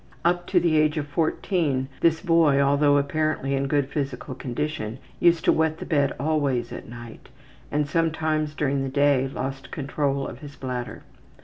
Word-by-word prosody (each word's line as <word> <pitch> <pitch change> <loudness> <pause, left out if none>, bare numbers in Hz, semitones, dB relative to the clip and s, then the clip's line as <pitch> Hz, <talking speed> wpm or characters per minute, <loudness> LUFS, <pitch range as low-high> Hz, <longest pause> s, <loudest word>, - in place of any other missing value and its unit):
Up 175 0 +1
to 185 - +3
the 165 -2 +2
age 155 0 +2
of 150 - -1
14 155 -3 0
this 165 -1 +2
boy, 165 -6 +4
although 145 +1 +4
apparently 145 -1 0
in 135 0 0
good 145 -1 +1
physical 135 -2 -4
condition, 125 -2 -4 0.2
used 170 -1 +3
to - - +6
wet 160 0 +1
the - - -7
bed 140 -4 +2
always 140 -5 0
at - - -8
night, 120 -1 -11 0.4
and 150 0 0
sometimes 155 -1 0
during 140 -2 0
the 135 - -2
day 140 -1 +3
lost 135 0 -5
control 140 -1 -2
of 120 - -9
his 145 -1 -10
bladder. 125 -2 -5
145 Hz, 170 wpm, -25 LUFS, 135-155 Hz, 0.4 s, to